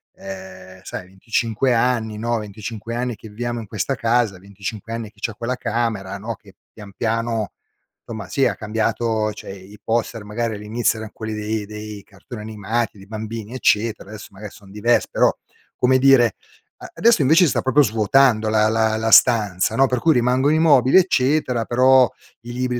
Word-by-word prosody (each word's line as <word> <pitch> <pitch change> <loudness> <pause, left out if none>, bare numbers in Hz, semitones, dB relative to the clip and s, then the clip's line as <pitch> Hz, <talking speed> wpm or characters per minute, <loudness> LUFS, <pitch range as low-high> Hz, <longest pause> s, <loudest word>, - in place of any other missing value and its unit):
ehm, 95 -1 -10
sai 90 - -7
25 115 +5 -1
anni 115 -3 0
no, 120 +1 -1
25 110 +2 -7
anni 125 -1 -2
che 110 - -12
viviamo 120 +2 -4
in 110 - -8
questa 115 +6 -2
casa, 115 -5 0
25 100 +3 -7
anni 115 -2 -5
che - - -26
c'ha 115 - -3
quella 120 +3 -3
camera 110 -5 -2
no, 110 +3 -5
che 100 -3 -19 0.2
pian 100 -3 -12
piano, 115 -2 -1 0.5
somma 110 -5 -7
sì 135 -2 +1
ha 105 - -2
cambiato 110 0 -1
cioè, 100 - -9
i 95 +1 -13
i 105 - -14
poster 115 -1 -2
magari 110 +1 -3
all'inizio 110 +2 -1
eran 110 -1 -8
quelli 110 -1 -6
dei 105 0 -3
dei 105 -1 -8
cartoni 105 +3 -11
animati, 110 +1 -3
dei 95 - -14
bambini, 110 +1 -6
eccetera, 110 -4 0
adesso 110 -1 -9
magari 105 +1 -10
son 100 -2 -16
diversi; 115 +4 +1
però, - - +4 0.5
come 130 +1 +3
dire, 130 -5 +5 0.6
adesso 230 -7 +4
invece 160 +7 +5
si 160 - +4
sta - - 0
proprio 130 +3 +3
svuotando 115 0 +3
la 110 0 +3
la 110 0 +1
la 110 0 -1
stanza, 105 -4 +4
no, 135 +2 +4
per 125 -1 -1
cui 160 -1 +3
rimangono 125 +4 +2
i - - +2
mobili 140 -4 +4
eccetera 130 - +2
però, 130 +1 +5 0.3
i 120 - -8
libri 125 0 -2
115 Hz, 180 wpm, -21 LUFS, 105-120 Hz, 0.6 s, dire